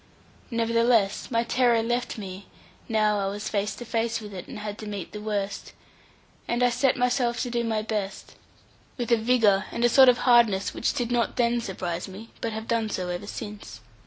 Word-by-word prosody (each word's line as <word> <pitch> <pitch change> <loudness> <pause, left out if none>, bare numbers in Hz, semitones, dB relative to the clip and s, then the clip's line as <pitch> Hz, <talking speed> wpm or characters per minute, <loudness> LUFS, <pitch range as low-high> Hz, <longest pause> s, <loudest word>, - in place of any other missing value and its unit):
Nevertheless, 230 -3 +2
my 230 -1 +1
terror 240 -1 +2
left 240 +1 -1
me, 190 -2 -8 0.4
now 215 -2 +2
I 195 - -1
was 205 +2 -4
face 205 0 -1
to 240 - -8
face 230 0 -1
with 210 -2 -9
it, 180 -2 -7
and - - -8
had 210 0 -6
to 215 - -7
meet 200 -4 -5
the 210 - -7
worst; 205 -2 -3 0.7
and 240 +1 0
I 245 - +4
set 250 +2 +2
myself 245 -1 +1
to 245 - -3
do 235 0 0
my 220 -2 -1
best 210 -3 -4 0.6
with 240 -2 -3
a 235 - +6
vigour 220 -4 +3
and 240 0 +2
sort 265 0 +8
of 245 - +4
hardness 235 -6 +4
which - - -1
did 245 -3 -2
not 240 -2 +1
then 240 -1 +2
surprise 180 -4 -4
me, 200 +4 -10
but 230 - -2
have 220 +1 -6
done 230 -2 0
so 180 -3 -3
ever 180 +3 -4
since. 205 - -7
225 Hz, 195 wpm, -26 LUFS, 205-240 Hz, 0.7 s, sort